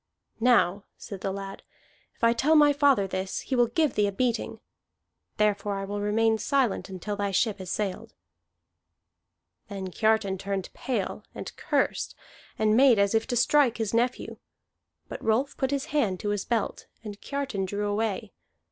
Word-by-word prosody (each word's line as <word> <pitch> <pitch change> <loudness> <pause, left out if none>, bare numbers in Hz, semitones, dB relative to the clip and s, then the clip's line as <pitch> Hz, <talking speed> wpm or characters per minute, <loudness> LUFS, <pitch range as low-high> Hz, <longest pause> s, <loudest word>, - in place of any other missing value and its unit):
"Now," 215 -5 +3
said 200 -4 -8
the 195 - -2
lad, 195 0 -6 0.5
"if - - -25
I 230 0 +5
tell 290 +7 +3
my 295 -1 +6
father 280 -8 +3
this, 190 0 -3
he 265 - -3
will 240 -1 +4
give 290 +4 +1
thee 205 -1 +2
a - - -1
beating. 235 +3 -1 0.8
Therefore 205 -1 +1
I 195 - -4
will 205 +1 -4
remain 220 +2 +2
silent 260 -7 0
until 195 +2 -4
thy 205 0 -1
ship 200 +2 0
has 185 -1 -7
sailed." 195 -2 -3 1.5
Then 195 -3 -6
Kiartan 215 -2 +1
turned 195 -1 -4
pale, 230 -8 -3
and - - -7
cursed, - - -1 0.4
and 215 0 +3
made 255 -2 +6
as 200 +1 +2
if 225 0 +1
to 245 - -1
strike 250 0 +3
his 225 -2 -2
nephew. 245 +2 0 0.7
But - - -8
Rolf 250 +6 +1
put 265 - -1
his 280 -1 -1
hand 210 -12 +1
to 205 - -2
his 205 -2 -1
belt, 230 -3 -2 0.2
and 205 -2 -8
Kiartan 275 -9 -3
drew 205 +2 -3
away. 210 0 -2
215 Hz, 165 wpm, -27 LUFS, 200-245 Hz, 1.5 s, my